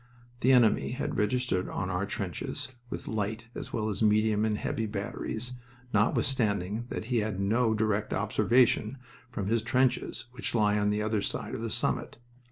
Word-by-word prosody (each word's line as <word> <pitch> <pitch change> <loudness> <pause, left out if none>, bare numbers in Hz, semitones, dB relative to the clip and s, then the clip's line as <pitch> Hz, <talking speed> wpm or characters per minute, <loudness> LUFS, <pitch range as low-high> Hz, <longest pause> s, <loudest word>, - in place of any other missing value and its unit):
The 130 - +4
enemy 120 -2 +4
had 130 - -3
registered 105 -3 0
on 95 0 -2
our 95 +2 -1
trenches 100 +3 -4 0.2
with - - -6
light, 110 +2 -3
as - - -7
well 110 -1 -1
as 105 0 -3
medium 110 0 +3
and 105 -1 0
heavy, 110 +1 -2
batteries, 110 +4 -2 0.3
notwithstanding 105 -1 +1
that - - -4
he 120 - +4
had 105 -2 -2
no 110 +3 +2
direct 105 -1 0
observation 110 +4 +2 0.3
from 100 -5 -4
his 115 +3 +1
trenches, 120 0 +1
which 120 -3 -4
lie 105 -2 +3
on 105 0 +2
the 105 +1 0
other 110 -1 0
side - - -3
of - - -4
the - - -2
summit. - - -1
110 Hz, 170 wpm, -29 LUFS, 105-120 Hz, 0.3 s, The